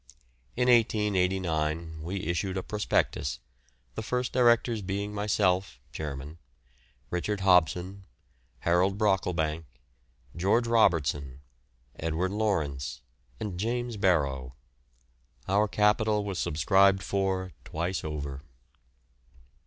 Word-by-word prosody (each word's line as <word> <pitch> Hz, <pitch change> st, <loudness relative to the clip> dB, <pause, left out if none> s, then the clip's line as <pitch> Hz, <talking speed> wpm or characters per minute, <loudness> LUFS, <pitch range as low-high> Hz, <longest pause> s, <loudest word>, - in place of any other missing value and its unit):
In 125 Hz, +1 st, +1 dB
1889 90 Hz, -8 st, +1 dB
we 90 Hz, +4 st, -4 dB
issued 90 Hz, +2 st, -1 dB
a 95 Hz, -, -2 dB
prospectus, 105 Hz, -8 st, -1 dB, 0.6 s
the -, -, -4 dB
first 125 Hz, +3 st, -2 dB
directors 120 Hz, -2 st, +3 dB
being 100 Hz, +2 st, -3 dB
myself 100 Hz, -7 st, 0 dB
(chairman), 75 Hz, +1 st, -6 dB, 0.7 s
Richard 100 Hz, +3 st, -2 dB
Hobson, 90 Hz, +1 st, +2 dB, 0.6 s
Harold 90 Hz, +3 st, +2 dB
Brocklebank, 85 Hz, -6 st, 0 dB, 0.7 s
George 100 Hz, +7 st, +2 dB
Robertson, 75 Hz, -, +1 dB, 0.6 s
Edward 80 Hz, +4 st, -1 dB
Lawrence, 85 Hz, -11 st, -1 dB, 0.4 s
and 95 Hz, -4 st, -4 dB
James 120 Hz, +2 st, -2 dB
Barrow. 70 Hz, -, 0 dB, 0.9 s
Our 105 Hz, +2 st, +3 dB
capital 105 Hz, +1 st, +2 dB
was 100 Hz, -3 st, -4 dB
subscribed 95 Hz, +6 st, +3 dB
for 95 Hz, -1 st, -1 dB
twice 85 Hz, +4 st, -3 dB
over. 70 Hz, -3 st, -5 dB
95 Hz, 90 wpm, -28 LUFS, 80-105 Hz, 0.9 s, directors